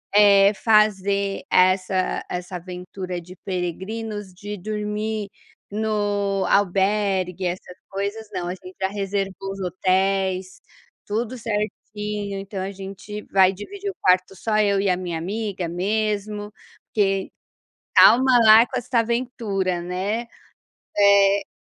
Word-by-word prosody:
eh, 200 Hz, 0 st, +7 dB
fazer 200 Hz, -2 st, +2 dB
essa 185 Hz, 0 st, +2 dB
essa 180 Hz, +1 st, -5 dB
aventura 180 Hz, 0 st, -6 dB
de 180 Hz, +2 st, -12 dB
peregrinos, 195 Hz, +3 st, -4 dB
de 205 Hz, +3 st, -7 dB
dormir 210 Hz, +1 st, -3 dB, 0.4 s
no 205 Hz, -2 st, 0 dB
albergue, 195 Hz, -1 st, +1 dB
essas 180 Hz, 0 st, -4 dB
coisas 200 Hz, +3 st, -4 dB
não, 175 Hz, -, -3 dB
a -, -, -2 dB
gente 185 Hz, 0 st, -12 dB
já 190 Hz, -, +1 dB
reservou 195 Hz, -1 st, -3 dB
os 195 Hz, -, -7 dB
hotéis, 185 Hz, 0 st, 0 dB, 0.4 s
tudo 225 Hz, +4 st, -2 dB
certinho, 210 Hz, -2 st, -4 dB
então 195 Hz, 0 st, -6 dB
a 190 Hz, +1 st, -3 dB
gente 195 Hz, +2 st, -8 dB
vai 190 Hz, -1 st, +4 dB
dividir 395 Hz, -, -6 dB
o 390 Hz, -, -7 dB
quarto 185 Hz, +1 st, +3 dB
só 215 Hz, +1 st, -1 dB
eu 200 Hz, -2 st, +3 dB
e 195 Hz, 0 st, +1 dB
a 180 Hz, -, +3 dB
minha 175 Hz, -2 st, -4 dB
amiga 195 Hz, 0 st, -3 dB
mesmo, 210 Hz, +3 st, -2 dB, 0.3 s
porque 195 Hz, -2 st, 0 dB, 0.7 s
calma 260 Hz, +2 st, +7 dB
lá 220 Hz, +2 st, +8 dB
com 260 Hz, -, -6 dB
essa 245 Hz, 0 st, -1 dB
aventura, 225 Hz, -6 st, -1 dB
né, 190 Hz, +7 st, -2 dB, 0.7 s
eh 200 Hz, 0 st, +5 dB
200 Hz, 120 wpm, -23 LUFS, 185-210 Hz, 0.7 s, lá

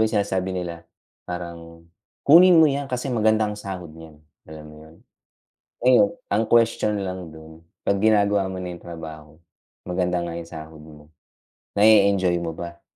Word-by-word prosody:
yung -, -, -6 dB
sinasabi 95 Hz, -2 st, -1 dB
nila, 85 Hz, -2 st, -6 dB, 0.4 s
parang, 85 Hz, -1 st, -8 dB, 0.4 s
"Kunin 175 Hz, +4 st, +7 dB
mo 160 Hz, -, +7 dB
yan 140 Hz, -2 st, -1 dB
kasi 125 Hz, 0 st, -3 dB
maganda 110 Hz, -1 st, +2 dB
ang 105 Hz, -, -3 dB
sahod 90 Hz, -5 st, -7 dB
nyan," 80 Hz, -1 st, -14 dB, 0.3 s
alam 80 Hz, -1 st, -10 dB
mo 75 Hz, 0 st, -13 dB
yun? 80 Hz, -, -18 dB, 0.9 s
Ayun, 120 Hz, -5 st, +5 dB, 0.2 s
ang 110 Hz, +1 st, 0 dB
question 115 Hz, -2 st, +2 dB
lang 95 Hz, -3 st, -5 dB
dun, 80 Hz, +1 st, -14 dB, 0.2 s
pag 100 Hz, -1 st, 0 dB
ginagawa 100 Hz, -3 st, +2 dB
mo 95 Hz, -, -6 dB
na 90 Hz, -1 st, -6 dB
yung 85 Hz, -, -12 dB
trabaho, 80 Hz, -3 st, -10 dB, 0.5 s
maganda 90 Hz, 0 st, -1 dB
nga 85 Hz, -, -5 dB
yung 85 Hz, 0 st, -8 dB
sahod 80 Hz, 0 st, -10 dB
mo, 75 Hz, 0 st, -16 dB, 0.6 s
na 105 Hz, +2 st, +4 dB
e-enjoy 100 Hz, -4 st, +4 dB
mo 85 Hz, -1 st, -4 dB
ba? 85 Hz, +1 st, -9 dB
90 Hz, 160 wpm, -23 LUFS, 80-105 Hz, 0.9 s, Kunin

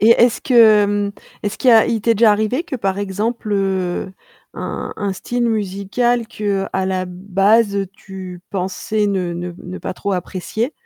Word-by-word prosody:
Et 220 Hz, +2 st, +6 dB
est-ce 235 Hz, 0 st, +5 dB
que, 255 Hz, -, -1 dB
hem, 205 Hz, -3 st, +5 dB, 0.3 s
est-ce 205 Hz, 0 st, -3 dB
qu'il 255 Hz, -, +4 dB
y -, -, +7 dB
a 225 Hz, -1 st, +7 dB
il 225 Hz, -, 0 dB
t'est 230 Hz, +2 st, +2 dB
déjà 220 Hz, +1 st, +5 dB
arrivé 220 Hz, +8 st, +1 dB
que, 275 Hz, -7 st, -5 dB
par 195 Hz, -3 st, -1 dB
exemple, 210 Hz, +3 st, -2 dB
heu, 190 Hz, -2 st, -1 dB, 0.4 s
un -, -, -5 dB
un 200 Hz, -2 st, -2 dB
style 240 Hz, +5 st, -2 dB
musical 220 Hz, +3 st, 0 dB
que, 200 Hz, -2 st, -2 dB
à 190 Hz, 0 st, 0 dB
la 185 Hz, -1 st, -1 dB
base, 200 Hz, +4 st, +2 dB
heu, 200 Hz, -1 st, 0 dB
tu 190 Hz, -3 st, -9 dB
pensais 200 Hz, +3 st, -1 dB
ne 185 Hz, -3 st, -1 dB
ne 175 Hz, +1 st, -5 dB
ne 180 Hz, +1 st, -8 dB
pas -, -, -5 dB
trop 200 Hz, +2 st, -3 dB
apprécier, 190 Hz, -, -3 dB
200 Hz, 180 wpm, -19 LUFS, 190-225 Hz, 0.4 s, y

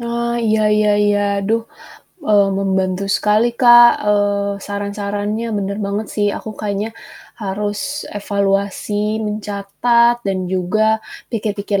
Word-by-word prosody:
Oh, 235 Hz, 0 st, -2 dB
iya 220 Hz, -1 st, +1 dB
iya 210 Hz, 0 st, +3 dB, 0.2 s
iya. 205 Hz, 0 st, +2 dB, 0.3 s
Aduh, 225 Hz, +3 st, +1 dB, 0.7 s
eee, 205 Hz, -2 st, +5 dB
membantu 190 Hz, -1 st, 0 dB
sekali 210 Hz, +2 st, +2 dB
Kak, 240 Hz, -1 st, +9 dB, 0.2 s
eee, 205 Hz, -1 st, +1 dB
saran-sarannya 205 Hz, +2 st, -3 dB
bener 200 Hz, +1 st, -3 dB
banget 205 Hz, +2 st, -3 dB
sih, 205 Hz, -1 st, +1 dB
aku 220 Hz, -, -7 dB
kayaknya 210 Hz, +2 st, -3 dB, 0.5 s
harus 210 Hz, +9 st, -3 dB
evaluasi 205 Hz, +1 st, -1 dB
mencatat 210 Hz, +3 st, +1 dB
dan 195 Hz, -1 st, 0 dB
juga 215 Hz, +5 st, +1 dB, 0.3 s
pikir-pikir 205 Hz, -3 st, -2 dB
205 Hz, 110 wpm, -18 LUFS, 200-220 Hz, 0.7 s, Kak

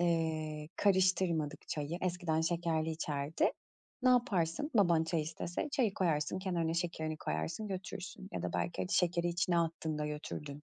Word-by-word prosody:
Eee, 160 Hz, -3 st, 0 dB
karıştırmadık 185 Hz, -6 st, +2 dB
çayı, 155 Hz, +3 st, -2 dB
eskiden 175 Hz, -3 st, 0 dB
şekerli 165 Hz, -1 st, +1 dB
içerdi. 150 Hz, -2 st, 0 dB, 0.5 s
Ne 255 Hz, -, +5 dB
yaparsın 220 Hz, -, +2 dB
baban 170 Hz, -6 st, +5 dB
çay 160 Hz, -1 st, 0 dB
istese? 170 Hz, -, -3 dB
Çayı 245 Hz, -9 st, +2 dB
koyarsın, 160 Hz, -2 st, +1 dB
kenarına 170 Hz, -4 st, 0 dB
şekerini 160 Hz, -2 st, -1 dB
koyarsın, 80 Hz, -, -2 dB
götürürsün 190 Hz, 0 st, -6 dB
ya -, -, -3 dB
da 90 Hz, -, -2 dB
belki 85 Hz, +1 st, -1 dB
hadi 90 Hz, -, -3 dB
şekeri 175 Hz, -1 st, +2 dB
içine 175 Hz, 0 st, +2 dB
attın 160 Hz, -2 st, -1 dB
da 150 Hz, -, -1 dB
götürdün. 150 Hz, -1 st, -5 dB
165 Hz, 145 wpm, -34 LUFS, 155-180 Hz, 0.5 s, Ne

